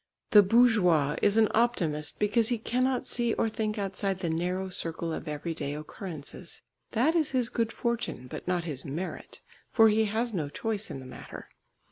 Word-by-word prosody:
The 210 - +9
bourgeois 190 - +4
is 205 +1 +3
an 220 -1 +6
optimist 165 -11 +1
because 215 +2 +2
he 240 - +1
cannot 255 +3 0
see 235 -2 0
or - - +1
think 215 0 -2
outside 195 -1 -2
the 175 -3 -2
narrow 180 +3 -1
circle 165 -2 -2
of - - -6
everyday 150 -1 -3
occurrences. 155 +1 -8 0.3
That 280 +9 +3
is 320 -4 +2
his 250 -3 +1
good 230 -1 -1
fortune, 235 - -2
but 125 - -8
not 180 -1 0
his 145 -6 -5
merit, 160 +7 -6 0.3
for 225 -2 +6
he 220 +1 +3
has 225 +3 -1
no 155 -6 -2
choice 215 +6 -2
in 135 - -6
the - - -11
matter. 130 - -10
200 Hz, 175 wpm, -29 LUFS, 165-230 Hz, 0.3 s, The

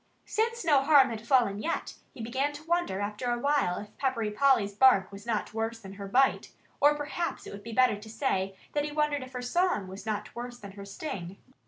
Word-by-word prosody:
Since 460 -1 -1
no 290 -4 +5
harm 275 -3 +6
had 225 - -4
yet 225 - -16
fallen 230 -6 +3
him, 335 - 0 0.3
he 230 - -8
began 265 +5 -1
to 290 +1 -10
wonder 335 - 0
after 210 +4 -3
a 240 - +1
while 280 -8 +1
if 210 - -9
Peppery 235 -6 0
Polly's 225 -4 +3
bark 205 -4 +5
was 200 +3 -11
not 220 -2 -1
worse 225 +1 -2
than 195 -3 -10
her 200 0 -7
bite 260 +6 +2 0.3
or 295 +1 +5
perhaps 300 +4 -3
it - - -8
would 200 - -8
be 230 +3 -8
better 255 -1 +4
to 215 +2 -11
say 195 -6 -1 0.2
that 290 - +1
he 295 - -3
wondered 300 -1 0
if 255 0 -9
her 250 -1 -4
song 345 - +1
was 190 +2 -9
not 210 -1 -3
worse 240 0 -6
than 200 -4 -10
her 200 0 -10
sting. 195 - -6
240 Hz, 225 wpm, -29 LUFS, 205-285 Hz, 0.3 s, harm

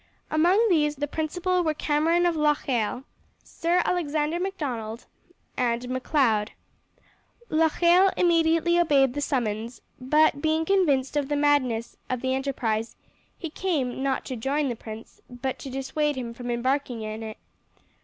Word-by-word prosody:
Among 360 +9 +4
these 300 -6 +2
the 290 +1 -2
principal 355 +5 -1
were 310 -2 0
Cameron 320 +4 +2
of 345 -1 +2
Locheil, 270 -6 0 0.4
Sir 345 +2 0
Alexander 315 -1 0
Macdonald, 255 - -4 0.5
and 240 -1 0
Macleod. 255 -5 +1 1.0
Locheil 340 +4 +4
immediately 335 0 +3
obeyed 275 -6 +3
the 290 - -3
summons, 235 -4 -2 0.2
but 290 +2 +3
being 315 +1 +1
convinced 300 -9 +2
of 290 -1 0
the 295 - +1
madness 280 -6 +1
of 255 -2 -2
the 260 0 0
enterprise 240 -5 -2 0.4
he 330 -4 -6
came, 290 -9 -2
not 270 -1 -1
to 260 - -4
join 275 +4 -1
the 240 - -2
prince, 220 0 -10
but 250 +1 -4
to 275 - -7
dissuade 285 +3 -1
him 240 -3 -5
from 245 +1 -7
embarking 245 -1 -1
in 215 +1 -5
it. 220 -1 -7
285 Hz, 140 wpm, -26 LUFS, 245-320 Hz, 1.0 s, Among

